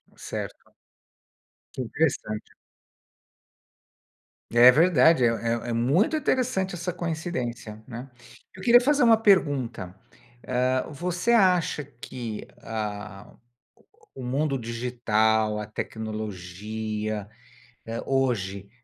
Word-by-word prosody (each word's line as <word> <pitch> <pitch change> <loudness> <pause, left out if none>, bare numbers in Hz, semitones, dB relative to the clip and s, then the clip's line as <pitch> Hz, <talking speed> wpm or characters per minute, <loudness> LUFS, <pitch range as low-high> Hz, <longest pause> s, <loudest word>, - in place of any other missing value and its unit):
Certo. - - -7 1.0
Que - - -4
interessante. 120 -5 -2 2.0
É 120 +2 +8
verdade, 160 -1 +5
é - - +6
é 115 +1 -2
é - - -1
muito 140 - +2
interessante 255 -10 0
essa 175 +1 -3
coincidência, 130 - -4
né. 125 +2 -8 0.5
Eu 190 - -10
queria 240 +2 +7
fazer 290 +2 +3
uma 230 -2 +7
pergunta, 140 - +1 0.5
eh, 130 +1 0
você 175 - -1
acha 180 -8 +3
que, 120 -4 -7 0.2
ah, 105 -2 -5
o 120 - -35 0.7
o - - -6
mundo 140 +3 0
digital, 110 -3 0
a 105 - -4
tecnologia, 110 0 -5 0.6
eh, 115 +1 -4
hoje, 100 -8 -1
125 Hz, 100 wpm, -26 LUFS, 110-165 Hz, 2.0 s, É